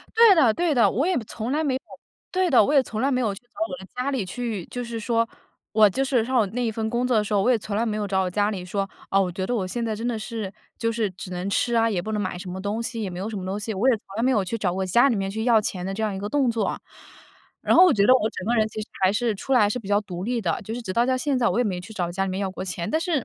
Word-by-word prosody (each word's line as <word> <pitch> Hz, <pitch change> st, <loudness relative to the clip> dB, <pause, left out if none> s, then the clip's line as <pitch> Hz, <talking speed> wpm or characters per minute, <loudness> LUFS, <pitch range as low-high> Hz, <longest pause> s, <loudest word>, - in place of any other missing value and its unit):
对 455 Hz, -3 st, +8 dB
的 265 Hz, -10 st, +5 dB
对 340 Hz, -4 st, +1 dB
的。 240 Hz, -, +4 dB
我 275 Hz, +9 st, 0 dB
也 370 Hz, -, +1 dB
从 235 Hz, +5 st, -4 dB
来 310 Hz, +2 st, +1 dB
没 265 Hz, -3 st, +1 dB
有 260 Hz, -, -2 dB, 0.5 s
对 370 Hz, -1 st, +1 dB
的， 235 Hz, -6 st, +6 dB
我 290 Hz, -, 0 dB
也 275 Hz, -, +6 dB
从 220 Hz, -3 st, -5 dB
来 275 Hz, -, +2 dB
没 255 Hz, -1 st, +1 dB
有 210 Hz, -5 st, 0 dB
去 -, -, -12 dB
找 245 Hz, +5 st, -16 dB
我 -, -, -5 dB
的 190 Hz, -, -11 dB
家 250 Hz, +3 st, -1 dB
里 260 Hz, -7 st, -1 dB
去， 215 Hz, -1 st, -4 dB
就 245 Hz, 0 st, -5 dB
是 230 Hz, -1 st, -5 dB
说 230 Hz, 0 st, +1 dB, 0.4 s
我 215 Hz, -1 st, +6 dB
就 265 Hz, +7 st, -1 dB
是 255 Hz, -4 st, +1 dB
上 235 Hz, -5 st, +2 dB
那 245 Hz, 0 st, -1 dB
一 225 Hz, -, +1 dB
份 220 Hz, 0 st, -2 dB
工 240 Hz, +1 st, 0 dB
作 250 Hz, -3 st, +2 dB
的 210 Hz, -, +2 dB
时 210 Hz, -, -5 dB
候， 200 Hz, -, +3 dB
我 250 Hz, -, +3 dB
也 240 Hz, -, +4 dB
从 205 Hz, 0 st, -5 dB
来 230 Hz, -, +1 dB
没 215 Hz, -, -1 dB
有 210 Hz, -1 st, -2 dB
找 190 Hz, -1 st, +1 dB
我 185 Hz, -, -2 dB
家 205 Hz, +3 st, +1 dB
里 185 Hz, -4 st, -5 dB
说， 195 Hz, +2 st, -2 dB, 0.2 s
哦， 195 Hz, -, +4 dB
我 185 Hz, -, -1 dB
觉 185 Hz, +1 st, -3 dB
得 245 Hz, -, -1 dB
我 195 Hz, -6 st, -1 dB
现 235 Hz, +5 st, -3 dB
在 220 Hz, -, -1 dB
真 225 Hz, +3 st, -4 dB
的 235 Hz, -3 st, -1 dB
是 215 Hz, -3 st, -5 dB, 0.3 s
就 230 Hz, -, 0 dB
是 220 Hz, -3 st, -1 dB
只 180 Hz, 0 st, -9 dB
能 180 Hz, +2 st, -3 dB
吃 240 Hz, +3 st, +1 dB
啊， 230 Hz, 0 st, +3 dB
也 195 Hz, -6 st, 0 dB
不 220 Hz, -, -4 dB
能 210 Hz, -, 0 dB
买 185 Hz, -2 st, -3 dB
什 185 Hz, 0 st, -8 dB
么 190 Hz, -, -5 dB
东 205 Hz, +4 st, -2 dB
西， 230 Hz, -2 st, -4 dB
也 200 Hz, -, -2 dB
没 180 Hz, -, -7 dB
有 195 Hz, -, -3 dB
什 215 Hz, -, -5 dB
么 185 Hz, -, -5 dB
东 195 Hz, +2 st, -2 dB
西。 215 Hz, +2 st, -4 dB
我 210 Hz, +7 st, +2 dB
也 250 Hz, -, +4 dB
从 215 Hz, -, -19 dB
来 225 Hz, -, -1 dB
没 255 Hz, -, +3 dB
有 215 Hz, -7 st, +2 dB
去 210 Hz, +5 st, -3 dB
找 185 Hz, -4 st, 0 dB
我 190 Hz, +1 st, -1 dB
家 235 Hz, +9 st, +5 dB
里 235 Hz, -, +1 dB
面 195 Hz, 0 st, -2 dB
去 220 Hz, +2 st, -3 dB
要 235 Hz, -3 st, +5 dB
钱 185 Hz, -3 st, -3 dB
的 195 Hz, -, -3 dB
这 220 Hz, -, -3 dB
样 210 Hz, -2 st, 0 dB
一 -, -, -4 dB
个 200 Hz, +1 st, -4 dB
动 275 Hz, -1 st, +2 dB
作 230 Hz, -1 st, 0 dB
啊。 -, -, -2 dB, 0.8 s
然 -, -, +3 dB
后 365 Hz, -, +9 dB
我 360 Hz, -, +5 dB
觉 200 Hz, -5 st, +3 dB
得 255 Hz, -, +7 dB
我 220 Hz, -4 st, +2 dB
整 185 Hz, -, -7 dB
个 235 Hz, -, +2 dB
人 220 Hz, -2 st, +3 dB
其 215 Hz, -, -6 dB
实 215 Hz, -, -6 dB, 0.2 s
还 190 Hz, +1 st, +4 dB
是 230 Hz, 0 st, 0 dB
出 235 Hz, +7 st, -4 dB
来 250 Hz, -, +6 dB
还 205 Hz, -, +4 dB
是 250 Hz, -, -1 dB
比 210 Hz, -5 st, -9 dB
较 205 Hz, 0 st, +3 dB
独 180 Hz, -2 st, -6 dB
立 240 Hz, +1 st, -1 dB
的， 170 Hz, -6 st, -1 dB
就 215 Hz, -, -6 dB
是 245 Hz, -, -4 dB
直 190 Hz, -, -4 dB
到 235 Hz, +4 st, +3 dB
到 260 Hz, -, +2 dB
现 270 Hz, 0 st, 0 dB
在 235 Hz, -, +3 dB
我 -, -, 0 dB
也 245 Hz, -, +3 dB
没 185 Hz, -5 st, -2 dB
去 185 Hz, +5 st, -11 dB
找 180 Hz, -5 st, -2 dB
家 195 Hz, +2 st, -1 dB
里 190 Hz, -, -3 dB
面 190 Hz, +1 st, -3 dB
要 195 Hz, -1 st, -1 dB
过 185 Hz, -, -6 dB
钱， 175 Hz, -2 st, -4 dB
但 315 Hz, -, +1 dB
是 325 Hz, -6 st, 0 dB
220 Hz, 380 characters per minute, -24 LUFS, 195-245 Hz, 0.8 s, 后